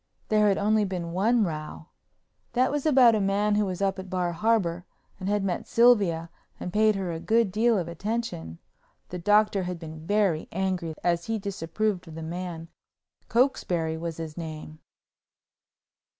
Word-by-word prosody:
There 215 Hz, -1 st, +4 dB
had 195 Hz, -, +3 dB
only 215 Hz, +1 st, +2 dB
been 180 Hz, -4 st, -3 dB
one 220 Hz, +6 st, +2 dB
row—that 160 Hz, -, -5 dB
was 295 Hz, +1 st, -1 dB
about 255 Hz, -5 st, +6 dB
a 215 Hz, -, +1 dB
man 200 Hz, +2 st, +1 dB
who 205 Hz, -1 st, +2 dB
was 185 Hz, +1 st, -3 dB
up 195 Hz, 0 st, 0 dB
at 190 Hz, 0 st, -8 dB
Bar 180 Hz, -1 st, -1 dB
Harbor 180 Hz, -3 st, +1 dB, 0.4 s
and 190 Hz, 0 st, -3 dB
had 205 Hz, -1 st, +1 dB
met 185 Hz, -3 st, -2 dB
Sylvia 200 Hz, -9 st, +3 dB, 0.3 s
and 180 Hz, -, -5 dB
paid 215 Hz, 0 st, +4 dB
her 190 Hz, -3 st, -2 dB
a 165 Hz, -, -4 dB
good 225 Hz, +2 st, +2 dB
deal 225 Hz, +3 st, +3 dB
of 175 Hz, -3 st, -2 dB
attention. 170 Hz, -, -4 dB, 0.5 s
The 180 Hz, -, -5 dB
Doctor 205 Hz, +2 st, +3 dB
had 180 Hz, -1 st, -4 dB
been 160 Hz, -1 st, -9 dB
very 200 Hz, -6 st, +1 dB
angry 185 Hz, -4 st, -2 dB
as 170 Hz, -1 st, +1 dB
he 225 Hz, 0 st, -1 dB
disapproved 195 Hz, 0 st, -2 dB
of 160 Hz, -, -10 dB
the 160 Hz, -, -6 dB
man—Cokesbury 170 Hz, -, -3 dB
was 165 Hz, 0 st, -5 dB
his 160 Hz, -2 st, -6 dB
name. 155 Hz, -2 st, -7 dB
190 Hz, 160 wpm, -26 LUFS, 170-215 Hz, 0.5 s, about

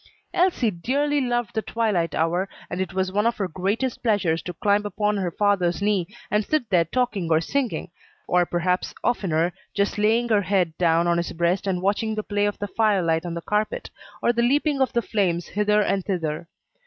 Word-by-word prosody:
Elsie 345 Hz, -, +2 dB
dearly 285 Hz, +10 st, 0 dB
loved 240 Hz, -3 st, -1 dB
the 220 Hz, -, 0 dB
twilight 210 Hz, -8 st, 0 dB
hour, 175 Hz, +4 st, 0 dB, 0.2 s
and 180 Hz, -, -2 dB
it 190 Hz, -, -3 dB
was 190 Hz, -1 st, -1 dB
one 210 Hz, +3 st, +2 dB
of 235 Hz, -, 0 dB
her 195 Hz, -, -1 dB
greatest 200 Hz, +9 st, -2 dB
pleasures 195 Hz, -8 st, +1 dB
to 180 Hz, -, -5 dB
climb 205 Hz, +4 st, +1 dB
upon 210 Hz, 0 st, 0 dB
her 190 Hz, -3 st, -1 dB
father's 185 Hz, -2 st, +1 dB
knee 200 Hz, -4 st, +1 dB, 0.2 s
and 210 Hz, 0 st, +2 dB
sit 305 Hz, 0 st, 0 dB
there 170 Hz, -3 st, +4 dB
talking 210 Hz, -3 st, -1 dB
or 160 Hz, -, +5 dB
singing, 255 Hz, +8 st, -2 dB, 0.4 s
or 180 Hz, 0 st, +3 dB
perhaps, 175 Hz, +1 st, -1 dB
oftener, 175 Hz, -7 st, +1 dB, 0.2 s
just 200 Hz, +1 st, 0 dB
laying 225 Hz, +3 st, +3 dB
her 215 Hz, -3 st, +3 dB
head 180 Hz, -4 st, 0 dB
down 170 Hz, -1 st, +3 dB
on 170 Hz, 0 st, +2 dB
his 170 Hz, -, -2 dB
breast 175 Hz, +4 st, 0 dB
and 185 Hz, -2 st, -1 dB
watching 210 Hz, +3 st, 0 dB
the 215 Hz, -, -2 dB
play 205 Hz, 0 st, 0 dB
of 205 Hz, -, -3 dB
the 205 Hz, -, -4 dB
fire 210 Hz, -3 st, +2 dB
light 165 Hz, +1 st, 0 dB
on 170 Hz, -, -4 dB
the 170 Hz, -, -4 dB
carpet, 210 Hz, +1 st, -1 dB, 0.3 s
or 240 Hz, -, +3 dB
the 235 Hz, -, +1 dB
leaping 280 Hz, +3 st, +2 dB
of 260 Hz, -, +2 dB
the 235 Hz, -, 0 dB
flame 190 Hz, -6 st, +1 dB
hither 210 Hz, +3 st, +1 dB
and 195 Hz, -1 st, 0 dB
thither. 165 Hz, -4 st, -3 dB
200 Hz, 205 wpm, -24 LUFS, 175-220 Hz, 0.4 s, or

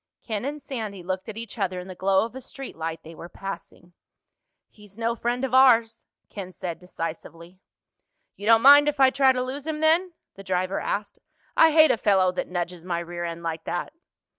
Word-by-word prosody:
Ken 220 Hz, 0 st, -4 dB
and 295 Hz, +2 st, -4 dB
Sandy 220 Hz, -9 st, -6 dB
looked 185 Hz, +3 st, -4 dB
at 220 Hz, -, -7 dB
each 230 Hz, 0 st, -8 dB
other 185 Hz, -2 st, -1 dB
in 180 Hz, -, -9 dB
the 185 Hz, -, -7 dB
glow 190 Hz, +3 st, +2 dB
of 230 Hz, -, -9 dB
a 260 Hz, -, -8 dB
street 270 Hz, +1 st, -9 dB
light 165 Hz, 0 st, -5 dB
they 165 Hz, -, -11 dB
were 170 Hz, +1 st, -10 dB
passing. 175 Hz, -2 st, -9 dB, 0.7 s
"He's 210 Hz, -1 st, -16 dB
no 230 Hz, 0 st, -1 dB
friend 240 Hz, +2 st, -1 dB
of 255 Hz, -, -6 dB
ours," 235 Hz, -3 st, +4 dB, 0.2 s
Ken 190 Hz, -3 st, -8 dB
said 175 Hz, -1 st, -6 dB
decisively. 170 Hz, 0 st, -8 dB, 0.7 s
"You 205 Hz, -, -8 dB
don't 225 Hz, 0 st, +6 dB
mind 285 Hz, +2 st, +8 dB
if 295 Hz, -1 st, -5 dB
I 265 Hz, -1 st, +6 dB
try 270 Hz, 0 st, +4 dB
to 250 Hz, -1 st, -1 dB
lose 275 Hz, +3 st, -6 dB
him 310 Hz, -1 st, -3 dB
then?" 335 Hz, +3 st, +2 dB, 0.2 s
the 195 Hz, -, -12 dB
driver 185 Hz, 0 st, -1 dB
asked. 205 Hz, 0 st, -4 dB, 0.4 s
"I 325 Hz, -, +7 dB
hate 315 Hz, 0 st, +6 dB
a -, -, +1 dB
fellow 190 Hz, -4 st, +3 dB
that 180 Hz, -, -4 dB
nudges 175 Hz, -1 st, -4 dB
my 175 Hz, -1 st, -2 dB
rear 175 Hz, 0 st, -5 dB
end 170 Hz, 0 st, -5 dB
like 165 Hz, -1 st, -4 dB
that." 175 Hz, +11 st, -4 dB
200 Hz, 205 wpm, -25 LUFS, 180-260 Hz, 0.7 s, mind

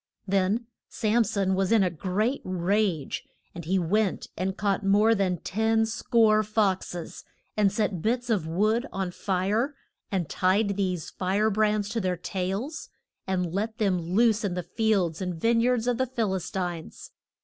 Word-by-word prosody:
Then 200 Hz, +4 st, +1 dB, 0.2 s
Sam 225 Hz, +1 st, +2 dB
son 195 Hz, -2 st, 0 dB
was 190 Hz, +1 st, 0 dB
in 225 Hz, -3 st, +5 dB
a 180 Hz, -, +1 dB
great 200 Hz, -, -1 dB
rage, 185 Hz, -3 st, 0 dB, 0.3 s
and 170 Hz, -2 st, -8 dB
he 190 Hz, +4 st, +1 dB
went 190 Hz, +3 st, 0 dB
and 190 Hz, +1 st, -2 dB
caught 200 Hz, 0 st, 0 dB
more 205 Hz, +3 st, +4 dB
than 190 Hz, -4 st, +1 dB
ten 220 Hz, +2 st, +1 dB
score 220 Hz, -1 st, +3 dB
fox 210 Hz, -4 st, 0 dB
es, 170 Hz, -2 st, -7 dB, 0.3 s
and 205 Hz, -2 st, +3 dB
set 205 Hz, -4 st, -1 dB
bits 240 Hz, +5 st, 0 dB
of 185 Hz, -8 st, 0 dB
wood 215 Hz, -, +1 dB
on 190 Hz, -2 st, -3 dB
fire, 200 Hz, +10 st, -1 dB, 0.4 s
and 185 Hz, -5 st, -1 dB
tied 200 Hz, +5 st, +1 dB
these 185 Hz, -4 st, -2 dB
fire 200 Hz, +4 st, +1 dB
brands 210 Hz, 0 st, +1 dB
to 225 Hz, +2 st, -2 dB
their 185 Hz, -2 st, -1 dB
tails, 195 Hz, -, -4 dB, 0.4 s
and 180 Hz, -3 st, -1 dB
let 220 Hz, +3 st, -2 dB
them 195 Hz, -4 st, +1 dB
loose 215 Hz, +6 st, +2 dB
in 190 Hz, -3 st, -1 dB
the 180 Hz, -, -3 dB
fields 195 Hz, -4 st, 0 dB
and 180 Hz, -3 st, -3 dB
vine 230 Hz, +4 st, +3 dB
yards 245 Hz, -1 st, +2 dB
of 245 Hz, -1 st, 0 dB
the 260 Hz, -, +1 dB
Phil 230 Hz, -6 st, -1 dB
is 180 Hz, -2 st, -3 dB
tines. 175 Hz, -4 st, -5 dB
200 Hz, 170 wpm, -27 LUFS, 185-220 Hz, 0.4 s, in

